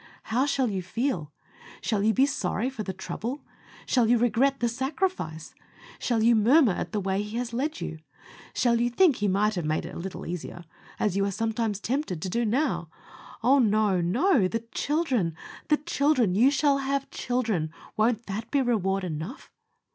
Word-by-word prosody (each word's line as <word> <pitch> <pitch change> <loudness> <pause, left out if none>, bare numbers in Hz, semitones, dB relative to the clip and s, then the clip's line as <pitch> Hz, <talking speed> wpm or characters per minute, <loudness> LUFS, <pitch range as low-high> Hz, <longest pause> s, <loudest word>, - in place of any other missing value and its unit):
How 260 +4 +3
shall 270 -3 +1
you 195 -4 -2
feel? 180 - -2 0.5
Shall 215 -4 -1
you 215 +2 +3
be 260 +4 +4
sorry 250 -2 -1
for 250 -5 -6
the 200 - -3
trouble? 235 +8 -5 0.4
Shall 240 -4 +2
you 240 - +5
regret 245 +4 +2
the 240 - +1
sacrifice? 265 - -2 0.5
Shall 230 -3 +1
you 235 +1 +5
murmur 240 +4 +5
at - - -4
the 215 - -1
way 195 0 -1
He 210 +2 -5
has 240 -1 -3
led 300 +7 -2
you? 160 - -5 0.6
Shall 235 -1 +2
you 240 - +2
think 300 +2 +4
He 205 - 0
might 205 +3 +2
have 175 -4 -2
made 155 +1 -1
it - - -8
a - - -6
little 185 +2 -6
easier, 175 0 -6 0.3
as 205 -4 +1
you 200 - +2
are - - 0
sometimes 225 0 -1
tempted 250 - -2
to 185 - -4
do 235 +5 0
now? 260 +8 0 0.5
Oh! 270 +4 +5
no, 210 -5 +3
no! 230 - +3
THE 230 +4 -2
CHILDREN! 265 - 0 0.3
THE 300 - +4
CHILDREN! 285 - +1
you 235 +8 +5
shall 280 0 +2
have 275 0 -2
children! 220 -11 -1 0.2
Won't 225 +1 +1
that 215 +3 -5
be 280 -2 +2
reward 195 -5 0
enough? 170 - -6
230 Hz, 185 wpm, -27 LUFS, 195-265 Hz, 0.6 s, you